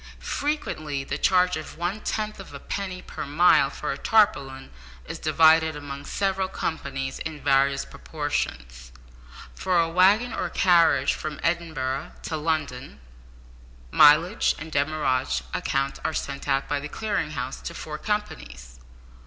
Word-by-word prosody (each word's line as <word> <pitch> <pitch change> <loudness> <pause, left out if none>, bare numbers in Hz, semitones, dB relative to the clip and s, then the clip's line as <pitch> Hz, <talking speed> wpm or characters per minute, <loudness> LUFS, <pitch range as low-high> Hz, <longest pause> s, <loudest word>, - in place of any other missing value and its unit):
Frequently 155 - -2
the - - -4
charge 180 -1 +3
of 155 0 -8
one 175 +5 -2
tenth 215 -1 -3
of - - -10
a - - -7
penny 185 -2 -5
per - - -7
mile 145 -1 +4
for - - -4
a 140 - -5
tarpaulin 140 -12 +2 0.3
is - - -7
divided 160 0 +4
among 140 -1 -7
several 195 -1 -1
companies 135 -7 -4
in 160 -2 -6
various 140 0 +2
proportions. 60 - -4 0.6
For 185 -2 +1
a 165 - +3
waggon 195 +8 +3
or - - -2
carriage 170 -7 +4
from 155 -2 -6
Edinburgh 160 -6 -2
to 160 - -3
London, 150 - -3 0.9
mileage 160 +8 +5
and 160 +1 -8
demurrage 145 -3 0
accounts 135 -6 -1
are 160 - -1
sent 140 0 -4
out 135 - +1
by 145 0 -1
the 150 +1 -7
Clearing 205 -6 -2
House 125 +2 -4
to - - -7
four 150 -1 -6
companies. 60 - -5
155 Hz, 140 wpm, -25 LUFS, 135-180 Hz, 0.9 s, mileage